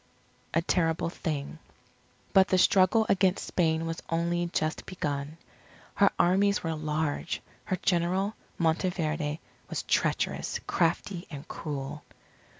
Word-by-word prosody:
A 165 - +3
TERRIBLE 165 -1 +1
THING 150 -2 -4 0.7
But 190 -1 +6
the 185 - +3
struggle 190 +4 +5
against 190 -1 +2
Spain 160 -2 +1
was 165 0 -4
only 170 +1 0
just 155 -2 -2
begun. 145 -4 -3 0.6
Her 200 -1 +5
armies 200 +3 +3
were 165 -1 -1
large. 155 +1 -2 0.3
Her 185 - 0
General, 185 +3 +1 0.2
Monteverde, 160 -2 0 0.3
was - - -3
treacherous, - - 0
crafty, 175 +2 0
and 145 -3 -8
cruel. 145 -1 -5
165 Hz, 115 wpm, -29 LUFS, 155-185 Hz, 0.7 s, But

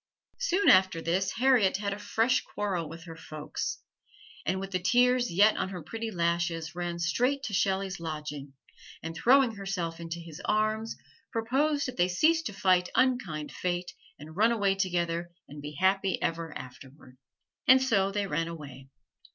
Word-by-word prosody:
Soon 405 -5 +1
after 185 -2 +6
this 185 +4 0
Harriet 240 -7 +3
had 200 0 -2
a 200 - -7
fresh 225 +4 +1
quarrel 185 -6 -3
with 165 +1 -10
her 165 -1 -9
folks; 155 -2 -5 0.7
and 185 +3 0
with 195 0 -6
the 185 - 0
tears 245 +5 +3
yet 205 +5 +5
on - - -1
her 180 -4 -7
pretty 225 +8 -5
lashes 170 -3 -1
ran 175 -1 -3
straight 250 +11 0
to 220 - -4
Shelley's 195 -1 0
lodging 150 -4 -6 0.5
and 165 0 -4
throwing 255 +6 +5
herself 195 -5 -4
into 165 0 -5
his 165 -3 -10
arms 215 +1 0 0.3
proposed 280 +6 +1
that 255 - -7
they 175 0 +3
cease 315 - +3
to 320 - -5
fight 185 -2 +2
unkind 220 - +1
Fate, 175 0 -3 0.2
and 155 +2 -11
run 220 +4 +4
away 200 -4 +2
together 175 -3 -1 0.2
and 145 0 -10
be 150 +1 -7
happy 190 +4 +1
ever 165 -1 -2
afterward. 130 0 -13 0.5
And 260 +1 +8
so 210 -7 +2
they 205 0 -1
ran 165 -4 -1
away. 140 -5 -9
185 Hz, 165 wpm, -29 LUFS, 165-220 Hz, 0.7 s, And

